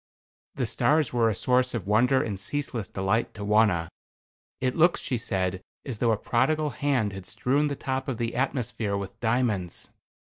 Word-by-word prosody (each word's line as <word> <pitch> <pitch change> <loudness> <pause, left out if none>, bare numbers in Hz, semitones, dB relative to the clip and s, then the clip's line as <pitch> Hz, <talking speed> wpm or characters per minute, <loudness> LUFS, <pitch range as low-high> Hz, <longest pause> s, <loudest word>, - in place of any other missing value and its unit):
The - - 0
stars 155 -3 +2
were 115 -2 +3
a 110 - -1
source 125 +1 +2
of 110 - -3
wonder 125 +6 +3
and 100 -4 -4
ceaseless 120 -2 -3
delight 95 +4 -1
to 105 -1 -5
Wauna. 105 -5 +3 0.7
"It 130 0 0
looks," 170 +2 +4
she 125 - -2
said, 95 -3 -1 0.2
"as 125 -6 -5
though 120 - +2
a 110 - +2
prodigal 150 +7 +1
hand 130 -9 0
had 95 -1 -7
strewn 140 +8 +1
the 145 - -2
top 130 0 -3
of 130 -4 -2
the 115 0 -2
atmosphere 120 -5 -1
with 100 0 -7
diamonds." 110 -7 -1
115 Hz, 175 wpm, -27 LUFS, 100-130 Hz, 0.7 s, looks